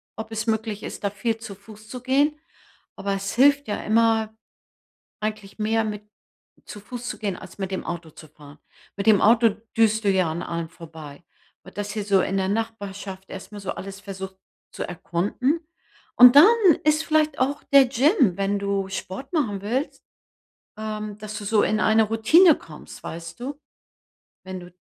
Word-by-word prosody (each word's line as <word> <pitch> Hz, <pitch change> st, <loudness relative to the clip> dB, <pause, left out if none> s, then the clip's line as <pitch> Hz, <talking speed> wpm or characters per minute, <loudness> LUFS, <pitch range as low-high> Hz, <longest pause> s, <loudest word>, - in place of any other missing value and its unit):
ob 220 Hz, 0 st, -7 dB
es 220 Hz, 0 st, -3 dB
möglich 220 Hz, -2 st, -2 dB
ist, -, -, -7 dB
da 200 Hz, -, +1 dB
viel 220 Hz, +3 st, -2 dB
zu 220 Hz, -3 st, -9 dB
Fuß 215 Hz, +2 st, -15 dB
zu 250 Hz, +1 st, -7 dB
gehen, 285 Hz, +4 st, +1 dB, 0.6 s
aber 200 Hz, 0 st, -2 dB
es 195 Hz, 0 st, -4 dB
hilft 285 Hz, +2 st, +4 dB
ja 205 Hz, -, -2 dB
immer, 225 Hz, 0 st, +2 dB, 0.9 s
eigentlich 215 Hz, -1 st, -5 dB
mehr 225 Hz, +1 st, +1 dB
mit 210 Hz, -1 st, -5 dB, 0.6 s
zu 210 Hz, -, -9 dB
Fuß 245 Hz, +4 st, -8 dB
zu -, -, -5 dB
gehen, 200 Hz, -4 st, -2 dB
als 185 Hz, -, -12 dB
mit 195 Hz, -1 st, -4 dB
dem 190 Hz, -, -3 dB
Auto 170 Hz, -1 st, -5 dB
zu 155 Hz, -, -14 dB
fahren. 145 Hz, -1 st, -15 dB, 0.4 s
Mit 200 Hz, -, -4 dB
dem 210 Hz, -3 st, +6 dB
Auto 230 Hz, +1 st, +5 dB, 0.3 s
düst 220 Hz, -1 st, +3 dB
du -, -, +4 dB
ja 185 Hz, -4 st, +2 dB
an 165 Hz, +2 st, -4 dB
allem 170 Hz, -1 st, -4 dB
vorbei. 160 Hz, -2 st, -12 dB, 0.4 s
Und 190 Hz, -, -15 dB
dass 205 Hz, 0 st, -3 dB
ihr 210 Hz, -2 st, -3 dB
so 195 Hz, -2 st, +3 dB
in 195 Hz, -, -1 dB
der 190 Hz, -1 st, 0 dB
Nachbarschaft 200 Hz, -3 st, -5 dB
erstmal 205 Hz, +2 st, -9 dB
so 195 Hz, -, -4 dB
alles 195 Hz, +1 st, -7 dB
versucht 190 Hz, -1 st, -8 dB, 0.3 s
zu -, -, -5 dB
erkunden. 190 Hz, -, -1 dB, 0.6 s
Und 250 Hz, +1 st, +9 dB
dann 295 Hz, -, +11 dB, 0.4 s
ist 305 Hz, +1 st, +3 dB
vielleicht 310 Hz, -2 st, +1 dB
auch 280 Hz, +3 st, 0 dB
der 275 Hz, -1 st, +9 dB
Gym, 260 Hz, -, +3 dB
wenn 200 Hz, +1 st, 0 dB
du 200 Hz, -1 st, -1 dB
Sport 190 Hz, -, -6 dB
machen 220 Hz, -, 0 dB
willst, 250 Hz, +9 st, -3 dB, 0.7 s
ähm, 215 Hz, -1 st, -5 dB
dass 210 Hz, 0 st, -7 dB
du 205 Hz, -, -7 dB
so 210 Hz, +1 st, +3 dB
in 215 Hz, -, +1 dB
eine 220 Hz, +1 st, +4 dB
Routine 250 Hz, -, +5 dB
kommst, 155 Hz, -2 st, -13 dB
weißt 165 Hz, 0 st, -8 dB
du? 275 Hz, +4 st, -6 dB, 0.8 s
Wenn 185 Hz, 0 st, -7 dB
du 175 Hz, 0 st, -13 dB
210 Hz, 180 wpm, -24 LUFS, 195-230 Hz, 0.9 s, dann